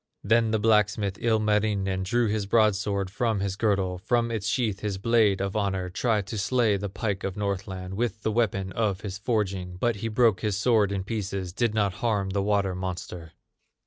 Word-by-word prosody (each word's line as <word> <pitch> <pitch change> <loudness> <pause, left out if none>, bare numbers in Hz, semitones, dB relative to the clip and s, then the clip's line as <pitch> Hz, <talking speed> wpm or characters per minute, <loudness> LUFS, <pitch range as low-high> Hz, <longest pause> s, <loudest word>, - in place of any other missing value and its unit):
Then 115 +2 +3
the 110 - +2
blacksmith, 105 -2 +2
Ilmarinen, 105 -4 +1
Drew 120 +6 +1
his 105 -2 -1
broadsword 100 -3 +2
from 110 0 0
his 95 -1 -2
girdle, 95 -4 0
From 115 +4 0
its 110 -3 -2
sheath 110 -4 0
his 105 -2 -3
blade 105 -1 +3
of 100 +1 -2
honor, 95 -3 -1
Tried 105 0 0
to 105 +1 -4
slay 110 0 +2
the 100 +1 -3
pike 100 0 -3
of 95 +1 -3
Northland 95 -2 -3
With 110 +1 -2
the 110 - +1
weapon 100 -4 0
of 100 -2 -1
his 100 -1 -6
forging; 100 -6 -1
But 115 +3 0
he 115 - -3
broke 115 -2 +3
his 105 -3 0
sword 110 -2 +3
in 95 -1 -2
pieces, 95 -4 -4
Did 115 +1 0
not 100 -3 +1
harm 105 -5 0
the 100 0 0
water 100 -2 +1
monster. 90 -2 -6
100 Hz, 185 wpm, -26 LUFS, 95-110 Hz, -, Then